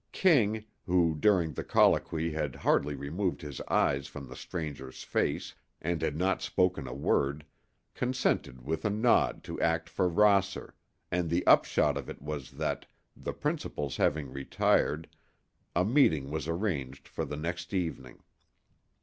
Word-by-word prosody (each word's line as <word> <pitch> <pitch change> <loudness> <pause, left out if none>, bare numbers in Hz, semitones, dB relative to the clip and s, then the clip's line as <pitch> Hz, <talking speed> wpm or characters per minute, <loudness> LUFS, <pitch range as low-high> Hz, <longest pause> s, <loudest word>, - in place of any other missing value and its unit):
King, 110 - +3 0.2
who 85 -3 +3
during 85 0 +2
the - - -4
colloquy 80 0 +3
had 75 -3 -2
hardly 75 - +1
removed 85 +6 -2
his 75 -3 -6
eyes 70 0 +2
from 70 - -9
the 65 - -10
stranger's 70 -7 -6
face - - -1 0.3
and 85 0 -2
had 75 -2 -1
not 95 +4 +1
spoken 90 -7 +1
a - - -5
word, 70 +2 0 0.5
consented 125 - -1
with 80 0 -2
a - - +2
nod 110 +4 +2
to - - -6
act 80 0 +1
for 90 - +1
Rosser, 100 +1 +2 0.4
and 90 -1 0
the 85 +2 0
upshot - - +4
of - - -6
it - - -7
was 75 -2 -5
that, - - -3 0.3
the - - -5
principals 70 -2 -3
having 75 -3 +1
retired, 70 +3 +1 0.7
a 90 +2 +3
meeting 85 - +3
was 80 0 -3
arranged 80 -7 -2
for - - -4
the 75 - -5
next 85 +3 -4
evening. 80 -9 -3
80 Hz, 150 wpm, -30 LUFS, 70-90 Hz, 0.7 s, upshot